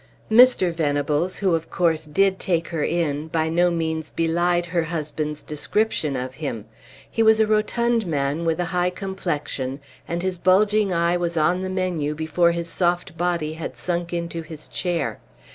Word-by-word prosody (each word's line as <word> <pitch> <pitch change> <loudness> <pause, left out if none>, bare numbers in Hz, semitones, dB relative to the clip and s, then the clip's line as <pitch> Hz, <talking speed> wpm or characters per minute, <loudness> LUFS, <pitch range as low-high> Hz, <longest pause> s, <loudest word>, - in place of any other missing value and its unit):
Mr. 225 -7 +6
Venables, 150 +2 0
who 190 -4 +1
of 165 0 -1
course 160 -3 +1
did 190 +5 +2
take 170 -2 0
her 165 -3 -2
in, 155 -3 -1
by 160 0 0
no 175 +2 +3
means 160 -2 -2
belied 175 +1 +1
her 175 0 0
husband's 155 -2 -3
description 155 -1 -1
of 130 0 -4
him; 130 -7 -5 0.4
he 225 - -1
was 220 0 +5
a 220 - +5
rotund 220 +1 +1
man 145 +1 -1
with 165 0 0
a 175 - +1
high 180 0 +2
complexion, 170 -8 -4 0.3
and 170 +1 -3
his 185 -2 -2
bulging 205 +2 +3
eye 170 0 +2
was 170 -1 -2
on 175 +4 +2
the 185 - -3
menu 180 -6 -1
before 160 +2 +2
his 170 0 -3
soft 175 0 -1
body 170 -2 -1
had 160 +1 -6
sunk 175 -1 -2
into 170 -1 -3
his 160 -1 -9
chair. 175 -5 -2
170 Hz, 170 wpm, -23 LUFS, 155-180 Hz, 0.4 s, Mr